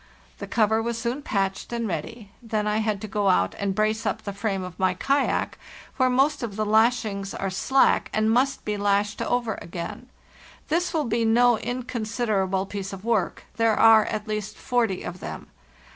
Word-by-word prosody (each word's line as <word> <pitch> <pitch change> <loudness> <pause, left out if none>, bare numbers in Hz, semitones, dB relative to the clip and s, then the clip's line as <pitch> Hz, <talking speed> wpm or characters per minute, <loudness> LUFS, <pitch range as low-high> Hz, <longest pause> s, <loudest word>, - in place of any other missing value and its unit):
The - - -6
cover 220 0 +2
was 235 0 -2
soon 240 +4 -2
patched 195 -6 -2
and 235 -1 -2
ready; 200 +5 -5
then 220 -3 -2
I 210 0 +1
had 215 -2 0
to 215 - -5
go 205 -1 +1
out 185 - +2
and 195 -1 -1
brace 215 +1 +1
up - - -2
the 200 - -4
frame 200 -2 -2
of 180 -1 -9
my 185 -1 +2
kayak 275 +9 0 0.4
where 255 -1 +3
most 275 +4 +2
of 225 -5 -4
the 215 0 -1
lashings 215 -2 +1
are 195 -1 -2
slack 265 +8 +2
and 215 0 +2
must 260 +4 +1
be 210 -1 -1
lashed 205 0 +1
over 235 -4 -1
again; 175 +9 -7 0.6
this 345 +3 +1
will 315 -2 0
be 230 0 0
no 235 0 +4
inconsiderable 220 -6 -1
piece 195 0 -5
of 195 +2 -9
work; 235 - 0
there 225 -2 +3
are 220 -1 +7
at 215 0 -4
least 215 -1 -4
forty 230 -7 0
of 180 - -6
them. - - -7
215 Hz, 185 wpm, -25 LUFS, 200-235 Hz, 0.6 s, are